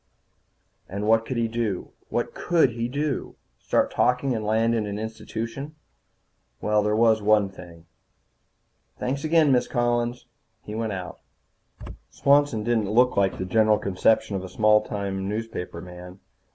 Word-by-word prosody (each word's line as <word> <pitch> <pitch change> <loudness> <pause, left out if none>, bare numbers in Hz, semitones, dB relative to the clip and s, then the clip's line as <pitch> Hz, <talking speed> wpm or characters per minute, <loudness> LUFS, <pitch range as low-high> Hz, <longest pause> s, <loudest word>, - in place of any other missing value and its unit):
And 100 +2 -4
what 115 0 +3
could 130 - -3
he 115 -1 +1
do? 110 -4 -3 0.2
What - - -2
could 165 -7 +2
he 115 +1 -3
do? 145 +2 -3 0.2
Start - - +1
talking 125 +1 +1
and 110 - -3
land 110 +2 +2
in 110 -2 -1
an 100 0 -4
institution? 115 +6 -6 0.8
Well, 105 0 +2
there 105 0 +1
was 110 -1 +4
one 105 -1 +3
thing. 85 -3 -13 1.1
"Thanks 135 +3 -3
again, 155 -2 +4
Miss 125 -2 +2
Collins." 120 0 -1 0.4
He 105 - -8
went 110 -1 -2
out. 90 -2 -7 0.9
Swanson 140 -6 +2
didn't 110 -3 0
look 125 +4 +3
like 100 -1 +1
the 95 - -3
general 110 +2 +3
conception 100 +2 +1
of 95 - -3
a 95 - -7
small 105 +2 +4
town 100 -2 -4
newspaperman. 90 -4 -6
110 Hz, 145 wpm, -25 LUFS, 100-120 Hz, 1.1 s, was